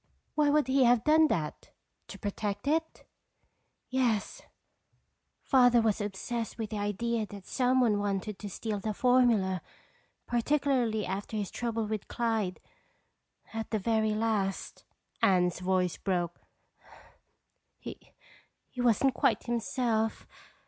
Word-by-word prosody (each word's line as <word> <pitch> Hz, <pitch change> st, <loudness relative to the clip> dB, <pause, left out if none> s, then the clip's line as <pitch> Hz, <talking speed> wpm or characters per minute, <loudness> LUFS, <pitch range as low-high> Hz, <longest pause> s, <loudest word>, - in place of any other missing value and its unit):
"Why 300 Hz, -1 st, +3 dB
would 295 Hz, -1 st, +3 dB
he 260 Hz, +1 st, +3 dB
have 240 Hz, -1 st, +4 dB
done 310 Hz, +2 st, +5 dB
that? 155 Hz, -, -3 dB, 0.4 s
To -, -, -9 dB
protect 205 Hz, +3 st, -4 dB
it?" 320 Hz, +2 st, -1 dB, 0.8 s
"Yes, 245 Hz, -5 st, 0 dB, 1.0 s
Father 245 Hz, -2 st, +5 dB
was 220 Hz, -2 st, +1 dB
obsessed 215 Hz, +3 st, -4 dB
with 225 Hz, -2 st, -4 dB
the 210 Hz, -, -3 dB
idea 215 Hz, +2 st, -1 dB
that 200 Hz, -2 st, -10 dB
someone 250 Hz, -4 st, +2 dB
wanted 205 Hz, 0 st, -2 dB
to 205 Hz, -, -6 dB
steal 210 Hz, +2 st, -3 dB
the 215 Hz, +1 st, -3 dB
formula, 230 Hz, -8 st, +3 dB, 0.6 s
particularly 240 Hz, -4 st, +1 dB
after 200 Hz, +3 st, -4 dB
his 200 Hz, -3 st, -3 dB
trouble 230 Hz, -2 st, -2 dB
with 215 Hz, -1 st, -4 dB
Clyde. 225 Hz, -6 st, -1 dB, 0.9 s
At 225 Hz, 0 st, -4 dB
the 220 Hz, -, 0 dB
very 220 Hz, +1 st, +1 dB
last—" 215 Hz, -3 st, -2 dB, 0.4 s
Anne's 180 Hz, -2 st, +3 dB
voice 180 Hz, -1 st, 0 dB
broke. 175 Hz, -3 st, -2 dB, 1.4 s
"—he -, -, -9 dB, 0.8 s
wasn't 245 Hz, +2 st, +3 dB
quite 240 Hz, -3 st, +1 dB
himself. 235 Hz, -2 st, -1 dB
220 Hz, 115 wpm, -30 LUFS, 200-245 Hz, 1.4 s, done